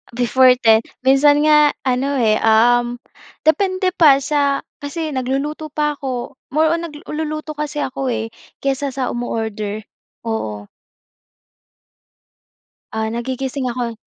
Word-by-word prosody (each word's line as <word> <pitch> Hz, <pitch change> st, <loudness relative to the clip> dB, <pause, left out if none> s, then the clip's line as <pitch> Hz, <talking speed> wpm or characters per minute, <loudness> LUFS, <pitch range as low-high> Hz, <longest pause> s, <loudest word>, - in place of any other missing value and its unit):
Before 250 Hz, +1 st, +4 dB
10, 225 Hz, -3 st, +4 dB, 0.2 s
minsan 290 Hz, +2 st, +5 dB
nga 300 Hz, -1 st, +5 dB
ano, 265 Hz, +2 st, 0 dB
eh, 220 Hz, -4 st, +2 dB
um, 240 Hz, +2 st, +3 dB, 0.5 s
depende 370 Hz, +3 st, +2 dB
pa, 280 Hz, -6 st, +5 dB
sa 280 Hz, -1 st, +1 dB, 0.2 s
kasi 310 Hz, +2 st, -4 dB
nagluluto 275 Hz, +4 st, -2 dB
pa 300 Hz, 0 st, -2 dB
'ko. 255 Hz, -1 st, -4 dB, 0.2 s
More 310 Hz, +3 st, +2 dB
on 335 Hz, 0 st, -1 dB
nagluluto 305 Hz, 0 st, -5 dB
kasi 300 Hz, -1 st, -3 dB
ako, 265 Hz, 0 st, -3 dB
eh, 225 Hz, -2 st, -2 dB, 0.3 s
kaysa 275 Hz, +1 st, 0 dB
sa 260 Hz, -2 st, -1 dB
umo-order. 220 Hz, -3 st, -4 dB, 0.4 s
Oo. 105 Hz, -, -4 dB, 2.3 s
Ah, 220 Hz, 0 st, -2 dB
nagigising 260 Hz, +2 st, -3 dB
ako. 235 Hz, -2 st, -4 dB
270 Hz, 115 wpm, -19 LUFS, 240-300 Hz, 2.3 s, minsan